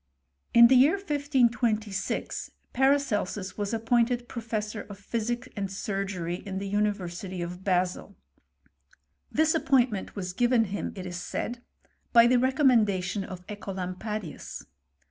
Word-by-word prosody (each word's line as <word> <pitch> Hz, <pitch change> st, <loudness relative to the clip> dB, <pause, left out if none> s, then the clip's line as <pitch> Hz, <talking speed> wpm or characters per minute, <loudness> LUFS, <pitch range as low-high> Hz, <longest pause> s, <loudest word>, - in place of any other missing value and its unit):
In 235 Hz, 0 st, +10 dB
the 255 Hz, +3 st, +6 dB
year 270 Hz, +5 st, +6 dB
1526 245 Hz, -, 0 dB, 0.2 s
Paracelsus 240 Hz, -8 st, +1 dB
was 205 Hz, -1 st, -2 dB
appointed 240 Hz, +1 st, +1 dB
pro 235 Hz, -, -6 dB
fessor 215 Hz, -1 st, -3 dB
of 200 Hz, -, -8 dB
physic 240 Hz, +5 st, -3 dB
and 195 Hz, -2 st, -3 dB
surgery 195 Hz, -3 st, -3 dB
in 195 Hz, -2 st, -5 dB
the 200 Hz, +1 st, -3 dB
University 195 Hz, -3 st, -2 dB
of 175 Hz, +2 st, -5 dB
Basil. 185 Hz, +1 st, 0 dB, 1.2 s
This 315 Hz, 0 st, +3 dB
appointment 260 Hz, -, +1 dB
was 185 Hz, -3 st, -4 dB
given 240 Hz, +2 st, +3 dB
him, -, -, -3 dB
it 185 Hz, -2 st, -6 dB
is 175 Hz, -1 st, -5 dB
said, 240 Hz, +5 st, -4 dB, 0.5 s
by 235 Hz, -1 st, +8 dB
the 245 Hz, +1 st, +4 dB
recommendation 220 Hz, -8 st, +2 dB
of 185 Hz, -1 st, -9 dB
(Ecolampadius. 195 Hz, -1 st, -5 dB
210 Hz, 125 wpm, -28 LUFS, 190-240 Hz, 1.2 s, In